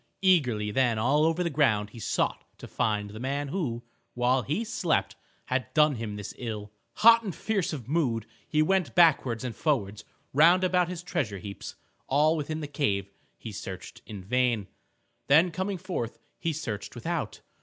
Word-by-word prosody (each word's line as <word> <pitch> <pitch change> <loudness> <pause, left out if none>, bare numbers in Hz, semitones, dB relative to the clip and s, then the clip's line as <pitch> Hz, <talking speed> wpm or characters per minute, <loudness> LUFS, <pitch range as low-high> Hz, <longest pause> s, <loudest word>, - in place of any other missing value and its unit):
Eagerly 125 - +3
then 120 -1 +2
all 140 +7 +3
over 165 +2 +1
the 170 - 0
ground 110 -8 +2
he 115 - -11
sought - - -1
to - - -10
find 105 -2 -1
the 110 - -8
man 140 +3 -2
who, 135 -9 -2 0.3
while 125 +1 +2
he 150 - -2
slept, 195 -7 0 0.3
had 130 0 -2
done 150 -1 +5
him 110 -4 -5
this 105 0 -6
ill. 105 -4 -5 0.2
Hot 230 +2 +7
and 195 -7 -5
fierce 205 -5 -1
of 135 -8 -6
mood 130 -8 0 0.2
he 155 0 +2
went 190 0 +1
backwards 135 -9 +4
and 120 -4 -4
forwards 105 -10 -1 0.3
round 170 +6 +6
about 180 -1 +3
his 180 -1 -6
treasure 145 - -2
heaps. 100 +1 -8 0.3
All 150 +4 +3
within 155 +1 -3
the 150 - -4
cave 100 -10 -1 0.3
he 115 - -8
searched 95 -3 -8
in 105 -4 -8
vain. 120 -1 +1 0.6
Then 160 +6 +5
coming 190 +2 -2
forth 175 - -4 0.2
he 165 - -1
searched 120 -9 -5
without. - - -3
135 Hz, 170 wpm, -28 LUFS, 110-165 Hz, 0.6 s, Hot